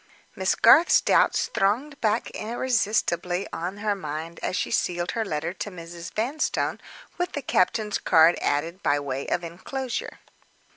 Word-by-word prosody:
Miss - - +1
Garth's 340 - +6
doubts - - +2
thronged 255 +9 0
back 220 +1 0
irresistibly 210 -6 -1
on 180 +4 -4
her 205 0 0
mind 165 -2 -6
as - - -2
she - - -2
sealed 175 0 0
her 225 - -1
letter 160 -3 -3
to 200 - -5
Mrs. 170 -2 -9
Vanstone, 260 +8 -1 0.4
with 355 0 -1
the 285 - -4
captain's 210 -1 +1
card 165 +2 +5
added 165 +6 -1
by 145 - +2
way 135 -1 -4
of 175 - -1
inclosure. 240 +10 -5
185 Hz, 145 wpm, -25 LUFS, 170-225 Hz, 0.4 s, Garth's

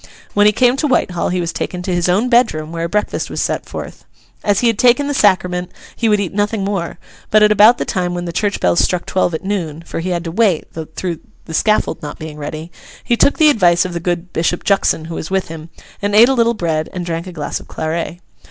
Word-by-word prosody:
When 205 0 +5
he - - +6
came 245 +4 +2
to 300 - 0
Whitehall, 185 -9 0
he 180 - -1
was 170 -1 -2
taken 180 -1 -4
to 185 - -2
his 175 0 +1
own 200 +7 +2
bedroom, 225 -11 +2
where 165 0 -3
a - - -4
breakfast 210 +2 -1
was - - -4
set - - -2
forth. - - -8 0.4
As 205 -2 +2
he - - +1
had 230 -3 +2
taken 250 +3 +4
the 285 - -1
Sacrament, 180 -6 +2 0.3
he 230 - 0
would 210 -1 +3
eat 195 -4 -3
nothing 205 0 0
more; 195 -4 -3 0.3
but, 215 0 +5
at 210 - +5
about 210 +3 +6
the - - -2
time 180 -1 -2
when 175 0 -4
the 170 - -5
church 205 +3 -1
bells 170 - +2
struck 180 -1 +1
twelve 175 -3 0
at 160 - -5
noon 170 -6 -3
(for - - -5
he 175 +3 -3
had 175 -2 -1
to 165 - -5
wait, 195 -4 +2 0.3
through 175 -4 -3 0.3
the 160 - -8
scaffold 215 +6 +1
not 150 - -7
being 155 -1 -8
ready), 155 +3 -6 0.3
he 240 - +1
took 280 - +3
the 305 -1 +6
advice 175 -8 +3
of 180 - -5
the 170 - -2
good 175 +1 -3
Bishop 170 +1 -1
Juxon 195 -5 +1
who 165 - -7
was 160 - -5
with 190 -2 -1
him, 160 0 -9 0.3
and 205 0 0
ate 230 +4 +7
a - - +3
little 235 -2 +2
bread 160 -5 -1
and 180 -1 -4
drank 170 +1 -4
a - - -7
glass 150 -4 -4
of - - -15
claret. 165 +2 -3
180 Hz, 250 wpm, -17 LUFS, 170-210 Hz, 0.4 s, ate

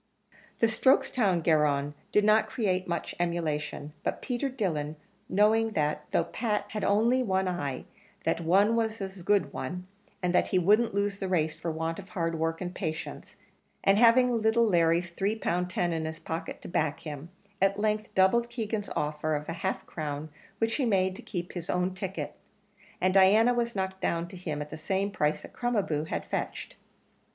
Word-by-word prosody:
The - - +4
Strokestown 220 - +3
garron 145 -3 +2 0.2
did 210 - +4
not 215 +1 +4
create 190 -5 0
much 170 -1 -3
emulation, 155 -4 -2
but - - -1
Peter 255 +1 -1
Dillon, 160 - -2 0.3
knowing 220 +3 +3
that 150 -3 -1
though - - +2
Pat 210 -3 -2
had 210 - -4
only 230 +5 +3
one 190 -5 +1
eye, 145 -8 -3 0.4
that - - 0
one 195 +7 +4
was 225 -1 0
a 190 -1 -6
good 180 -6 +2
one, 180 +8 -5 0.4
and 180 0 +1
that 180 - +3
he 185 - +1
wouldn't 210 +5 +3
lose 200 0 0
the 195 - -2
race 160 -4 +1
for 165 +1 -5
want 160 +2 -3
of 195 - -10
hard 165 -2 -2
work 165 +1 -1
and 180 0 -4
patience, 160 -5 -5 0.5
and 195 +1 +4
having 245 +2 +6
little 230 0 +3
Larry's 170 -3 +2
three 200 +5 -1
pound 180 -4 -1
ten 175 -2 0
in 160 -1 -2
his 160 0 -4
pocket 165 +1 -5
to - - -7
back 155 -3 -1
him, 150 +1 -7 0.3
at 195 +1 +3
length 215 0 0
doubled 235 +6 +4
Keegan's 220 -3 -3
offer 150 +1 -1
of 150 0 -3
half 165 +4 -3
a - - -29
crown 150 -1 -5 0.3
which 225 0 0
he 275 - +1
made 190 -3 +2
to - - -9
keep 175 -1 -5
his 175 -2 -6
own 180 +1 0
ticket, 190 +1 -4 0.7
and 185 0 +2
Diana 205 +5 +6
was 235 -1 -1
knocked 190 -1 -3
down 170 0 0
to 190 - -10
him 155 -5 -4
at 150 - -14
the 155 - -6
same 195 +4 -1
price 150 -6 0
that - - -11
Crom 240 0 -1
a 205 - +3
boo 150 -2 -2
had - - -3
fetched. - - -4
185 Hz, 190 wpm, -29 LUFS, 165-215 Hz, 0.7 s, having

